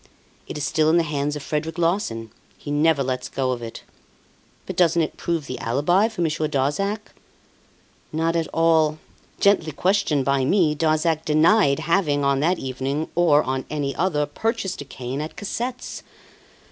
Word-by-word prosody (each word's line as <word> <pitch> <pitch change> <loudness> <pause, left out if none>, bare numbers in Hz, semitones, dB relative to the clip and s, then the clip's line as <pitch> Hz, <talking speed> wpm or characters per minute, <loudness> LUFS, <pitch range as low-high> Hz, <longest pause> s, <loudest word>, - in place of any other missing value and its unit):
"It - - -6
is 150 - -3
still 155 -1 +2
in 165 - +4
the 170 - +3
hands 150 -1 -2
of 145 - -6
Frederic 155 +3 -3
Larsan. 165 - -1 0.3
He 145 - -7
never 150 -1 +3
lets 125 -1 -3
go 130 -1 -1
of 125 -1 -3
it." 115 -1 -8 0.8
"But - - -5
doesn't 170 -2 +3
it 155 - -4
prove 165 -3 -2
the 130 - -6
alibi 150 - +2
for 220 -5 -6
Monsieur 155 -1 0
Darzac?" 160 +10 -1 1.0
"Not 165 +2 0
at 165 -2 0
all. 160 -2 +3 0.4
Gently 200 -6 +3
questioned 170 -4 +1
by 140 0 +2
me, 160 +1 +3
Darzac 155 +1 +1
denied 155 0 +4
having, 155 -5 +1
on 140 -1 +2
that 170 +5 +2
evening, 135 +4 -3
or 160 -4 +4
on 130 0 -2
any 145 -2 -2
other, 160 -5 +1
purchased 195 +3 -3
a - - -7
cane 130 +1 -5
at 155 - -6
Cassette's. 245 +5 -4
155 Hz, 165 wpm, -23 LUFS, 140-170 Hz, 1.0 s, in